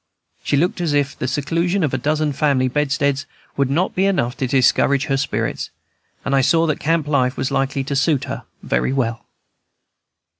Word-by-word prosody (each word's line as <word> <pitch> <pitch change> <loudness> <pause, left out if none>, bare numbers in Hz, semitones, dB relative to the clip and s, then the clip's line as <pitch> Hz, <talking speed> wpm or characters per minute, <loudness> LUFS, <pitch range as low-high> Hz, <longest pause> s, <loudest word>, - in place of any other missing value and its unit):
She 145 - +1
looked 175 +4 0
as 165 -4 0
if 140 -1 +1
the 130 - -3
seclusion 170 +7 0
of 145 - 0
a - - +1
dozen 150 +2 0
family 135 -2 +2
bedsteads 140 +1 0 0.3
would 140 -2 +1
not 170 +7 0
be 190 +1 +2
enough 125 -11 0
to 135 -2 -1
discourage 135 +2 +3
her 135 - 0
spirits, 135 - -2 0.6
and 140 - +1
I 135 - +4
saw 165 +5 +3
that 155 -3 -1
camp 160 -1 0
life 130 -3 +1
was 130 - -2
likely 135 0 0
to 140 +1 -3
suit 145 0 +2
her - - -5 0.2
very 130 - 0
well. 115 -4 -1
140 Hz, 185 wpm, -20 LUFS, 135-155 Hz, 0.6 s, I